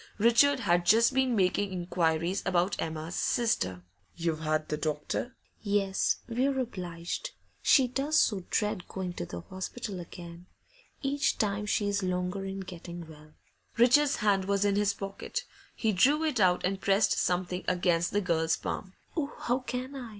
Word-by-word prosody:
Richard 240 Hz, +5 st, +4 dB
had 175 Hz, -4 st, +2 dB
just 230 Hz, +8 st, +5 dB
been 260 Hz, -2 st, +2 dB
making 195 Hz, 0 st, +1 dB
inquiries 175 Hz, 0 st, 0 dB
about 180 Hz, 0 st, +1 dB
Emma's 160 Hz, +1 st, -4 dB
sister. 95 Hz, -, 0 dB, 0.3 s
'You've 165 Hz, -2 st, -1 dB
had 155 Hz, -1 st, -1 dB
the 150 Hz, -, 0 dB
doctor?' 155 Hz, -, -3 dB, 0.3 s
'Yes, 200 Hz, -2 st, +1 dB
we're 260 Hz, +3 st, 0 dB
obliged; 180 Hz, -, -4 dB, 0.3 s
she 265 Hz, -3 st, +5 dB
does 280 Hz, +5 st, 0 dB
so 200 Hz, -, +3 dB
dread 210 Hz, -4 st, -1 dB
going 185 Hz, -2 st, -4 dB
to 85 Hz, -, -5 dB
the 85 Hz, -, -6 dB
hospital 190 Hz, -, -6 dB
again. 170 Hz, 0 st, -10 dB, 0.6 s
Each 285 Hz, +2 st, +1 dB
time 210 Hz, 0 st, -1 dB
she's 205 Hz, -1 st, +1 dB
longer 180 Hz, +1 st, -2 dB
in 195 Hz, 0 st, -4 dB
getting 175 Hz, -2 st, -8 dB
well.' 155 Hz, -1 st, -15 dB, 0.4 s
Richard's 270 Hz, +5 st, +5 dB
hand 200 Hz, -3 st, +2 dB
was 200 Hz, +1 st, +1 dB
in 200 Hz, -1 st, +2 dB
his 205 Hz, -1 st, +2 dB
pocket; 195 Hz, 0 st, -5 dB, 0.3 s
he 220 Hz, -, +1 dB
drew 280 Hz, -, +3 dB
it 305 Hz, -7 st, 0 dB
out 180 Hz, -3 st, +3 dB
and 190 Hz, +1 st, -1 dB
pressed 200 Hz, +1 st, +3 dB
something 180 Hz, 0 st, -1 dB
against 175 Hz, -2 st, +1 dB
the 205 Hz, -, +1 dB
girl's 165 Hz, -3 st, +1 dB
palm. 190 Hz, -2 st, -5 dB, 0.2 s
'Oh, 300 Hz, -3 st, -2 dB
how 245 Hz, +2 st, 0 dB
can 255 Hz, +1 st, -5 dB
I? 250 Hz, -4 st, -6 dB
195 Hz, 155 wpm, -29 LUFS, 175-235 Hz, 0.6 s, just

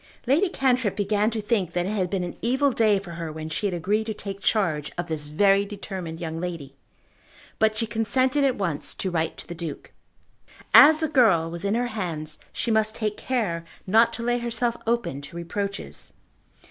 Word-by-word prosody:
Lady 310 Hz, +10 st, +3 dB
Cantrip 255 Hz, -, +1 dB
began 205 Hz, +1 st, +1 dB
to 220 Hz, -2 st, -4 dB
think 200 Hz, -6 st, 0 dB
that 175 Hz, 0 st, 0 dB
it -, -, -2 dB
had 190 Hz, -4 st, -1 dB
been 190 Hz, -1 st, -1 dB
an 175 Hz, -, -5 dB
evil 265 Hz, +4 st, +2 dB
day 215 Hz, -4 st, +3 dB
for 190 Hz, -3 st, -7 dB
her 165 Hz, -1 st, -5 dB
when 155 Hz, 0 st, -6 dB
she 205 Hz, +6 st, -1 dB
had 190 Hz, -, -3 dB
agreed 210 Hz, +6 st, 0 dB
to 220 Hz, -, -3 dB
take 195 Hz, -1 st, -6 dB
charge 170 Hz, -8 st, 0 dB
of 175 Hz, -, -2 dB
this 155 Hz, -3 st, -1 dB
very 195 Hz, +6 st, +3 dB
determined 190 Hz, -5 st, -6 dB
young 165 Hz, -2 st, -4 dB
lady; 165 Hz, -6 st, -5 dB, 0.9 s
but 220 Hz, 0 st, +3 dB
she 230 Hz, -, 0 dB
consented 255 Hz, +5 st, +1 dB
at 265 Hz, -2 st, +2 dB
once 170 Hz, -7 st, 0 dB
to 190 Hz, -, -3 dB
write 165 Hz, -1 st, -1 dB
to -, -, -9 dB
the 175 Hz, -, -7 dB
Duke. 165 Hz, -3 st, -7 dB, 0.8 s
As 310 Hz, +2 st, +9 dB
the 315 Hz, -, +2 dB
girl 210 Hz, -, +3 dB
was 170 Hz, 0 st, -5 dB
in 200 Hz, +2 st, +1 dB
her 245 Hz, +1 st, +1 dB
hands 155 Hz, -7 st, -4 dB
she 235 Hz, -, -2 dB
must 220 Hz, 0 st, +2 dB
take 215 Hz, -2 st, -2 dB
care 205 Hz, -10 st, -2 dB, 0.2 s
not 225 Hz, +4 st, +4 dB
to 235 Hz, -, -4 dB
lay 240 Hz, +1 st, +1 dB
herself 235 Hz, 0 st, -1 dB
open 235 Hz, -, -1 dB
to 145 Hz, +4 st, -10 dB
reproaches. 200 Hz, +4 st, -4 dB
200 Hz, 200 wpm, -25 LUFS, 170-230 Hz, 0.9 s, As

